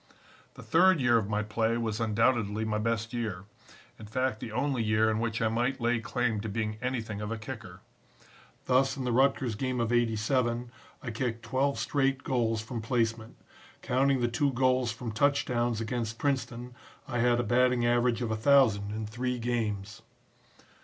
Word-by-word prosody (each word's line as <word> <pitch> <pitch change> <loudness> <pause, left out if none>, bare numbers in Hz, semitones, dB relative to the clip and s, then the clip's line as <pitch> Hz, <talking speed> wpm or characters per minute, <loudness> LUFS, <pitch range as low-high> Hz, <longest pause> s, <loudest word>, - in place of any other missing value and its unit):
"The - - -11
third 180 +1 +4
year 120 -3 +4
of 105 -2 -4
my 105 0 0
play 110 +2 0
was 110 -2 -2
undoubtedly 110 -1 +1
my 105 -1 -1
best 115 +1 -2
year; 110 -6 -3 0.6
in 110 - -9
fact 130 0 -1
the 110 - -6
only 130 +1 0
year 110 0 +2
in 110 - -1
which 115 0 -1
I - - +3
might 120 +4 0
lay 120 0 +1
claim 115 0 -1
to 110 - -4
being 110 0 -3
anything 115 -5 -3
of 105 +1 -4
a 115 - -2
kicker. 110 - -9 0.8
Thus 135 +2 +2
in 135 - -3
the 125 - -1
Rutgers 130 -1 +2
game 130 +3 -2
of 115 0 0
'87 120 +1 0 0.3
I 120 - -4
kicked 115 0 -3
twelve 135 +3 0
straight 135 -2 0
goals 115 -4 0
from 115 +1 -5
placement. 115 -1 -1 0.5
Counting 135 +1 +2
the 120 - +2
two 140 +4 +1
goals 130 -1 +2
from 115 0 -6
touchdowns 120 -2 +1
against 115 -1 -3
Princeton 125 -3 -2 0.3
I 120 -3 -2
had 120 0 +3
a - - +1
batting 125 +1 +2
average 120 0 +2
of 115 - -2
1000 110 -3 +3
in 110 +1 -4
three 125 +4 -3
games. 110 -4 -3
120 Hz, 175 wpm, -29 LUFS, 110-125 Hz, 0.8 s, third